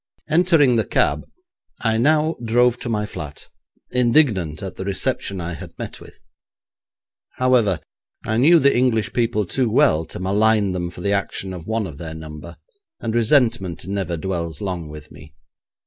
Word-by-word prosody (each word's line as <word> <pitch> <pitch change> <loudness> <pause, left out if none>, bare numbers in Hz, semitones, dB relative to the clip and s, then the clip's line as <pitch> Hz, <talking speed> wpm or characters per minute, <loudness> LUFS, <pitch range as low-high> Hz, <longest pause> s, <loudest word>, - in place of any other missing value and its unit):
Entering 155 -6 +4
the 110 - +2
cab - - 0 0.5
I 110 -1 +1
now 155 +4 +3
drove 120 +1 +2
to 120 - -5
my 105 -2 -1
flat, 75 -8 -8 0.4
indignant 120 - +2
at 95 - -6
the - - -5
reception 95 0 -1
I 85 0 -4
had - - -10
met - - -7
with. - - -14 1.2
However, 120 -9 +2 0.5
I 110 - 0
knew 155 +8 +6
the 140 -3 +4
English 120 -3 +1
people 115 -3 0
too 125 +7 0
well 110 - +3
to - - -7
malign 105 +2 +2
them 90 -1 -3
for 90 - -10
the 100 +2 0
action 95 -1 -2
of 85 -3 -9
one 110 -1 -1
of 80 -6 -9
their 80 -1 -6
number, 80 +2 -9 0.4
and 110 - -3
resentment 115 - +2
never 95 -3 -2
dwells 85 -3 -4
long 90 -5 -4
with 75 0 -11
me. 75 +1 -15
105 Hz, 165 wpm, -21 LUFS, 85-120 Hz, 1.2 s, knew